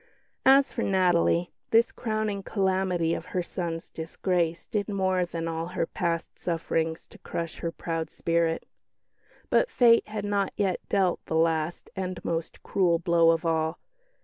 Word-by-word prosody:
As 270 +1 +6
for 235 - -2
Natalie, 175 -3 +2 0.2
this 230 +1 +4
crowning 215 -3 -2
calamity 190 -4 0
of 170 - -4
her 180 - +1
son's 170 -2 -4
disgrace 170 +1 -1
did 210 0 -2
more 190 -2 +1
than 165 -1 -4
all 165 0 -3
her 180 -2 -1
past 165 0 -3
sufferings 165 -1 -1
to - - -16
crush 165 -1 -5
her 170 - -2
proud 165 -1 -3
spirit. 165 -1 0 0.8
But - - +4
fate 235 - +5
had 210 -1 -4
not 200 -1 0
yet 190 -3 0
dealt 190 -3 +1
the - - -2
last 160 0 0
and 185 -1 -3
most 165 -1 -3
cruel 175 -4 +2
blow 170 -1 +4
of 165 +1 +2
all. 160 0 0
175 Hz, 150 wpm, -27 LUFS, 165-195 Hz, 0.8 s, As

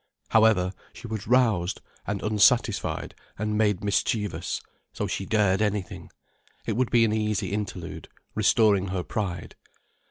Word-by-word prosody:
However, 105 -4 +4 0.2
she - - -11
was 110 -2 -5
roused 110 -8 +2 0.3
and 100 0 -3
unsatisfied 110 +1 +2 0.2
and 105 +1 -1
made 105 -3 +1
mischievous, 105 0 -1 0.3
so - - -2
she 95 - -3
dared 105 -3 +2
anything. 105 -3 -2 0.6
It 110 - -1
would 125 0 +1
be 115 -1 +4
an 110 - 0
easy 105 -2 -1
interlude, 100 -5 -5 0.2
restoring 100 -4 +3
her 90 -1 -2
pride. 90 -6 -4
105 Hz, 130 wpm, -26 LUFS, 95-110 Hz, 0.6 s, However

